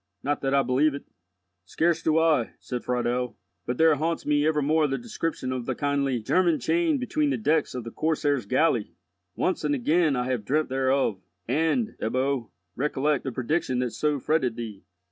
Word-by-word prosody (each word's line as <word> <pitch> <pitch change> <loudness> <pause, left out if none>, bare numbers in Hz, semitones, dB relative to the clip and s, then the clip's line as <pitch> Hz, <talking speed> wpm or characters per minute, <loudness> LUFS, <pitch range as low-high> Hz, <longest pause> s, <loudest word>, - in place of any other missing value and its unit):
Not 145 +2 -1
that 135 0 +1
I 140 - +4
believe 135 +4 +2
it." 140 - -8 0.6
"Scarce 165 - 0
do 160 -1 +2
I," 160 -7 +2
said 125 -1 -5
Friedel; 125 0 -1 0.3
"but 125 - -2
there 160 -1 +5
haunts 160 +3 -1
me 150 0 +2
evermore 155 0 +2
the 135 - -1
description 165 - -4
of 125 -2 -4
the 130 - -1
kindly 140 -3 0
German 170 +8 +2
chained 335 -4 +1
between 295 +3 0
the - - 0
decks 160 -10 +1
of 125 - -4
the 115 - -7
Corsair's 145 -6 0
galley. - - +1 0.4
Once - - -1
and 145 -1 +1
again 155 +3 +2
have 125 0 -1
I 130 0 0
dreamt 140 +8 -1
thereof. 130 -6 +1 0.3
And, 160 - 0
Ebbo, 130 +1 -1 0.3
recollect 145 +1 0
the 135 - -2
prediction 130 +2 -1
that 125 -1 -1
so 145 +6 0
fretted 130 -4 0
thee. 110 -4 -7
140 Hz, 180 wpm, -26 LUFS, 125-160 Hz, 0.6 s, there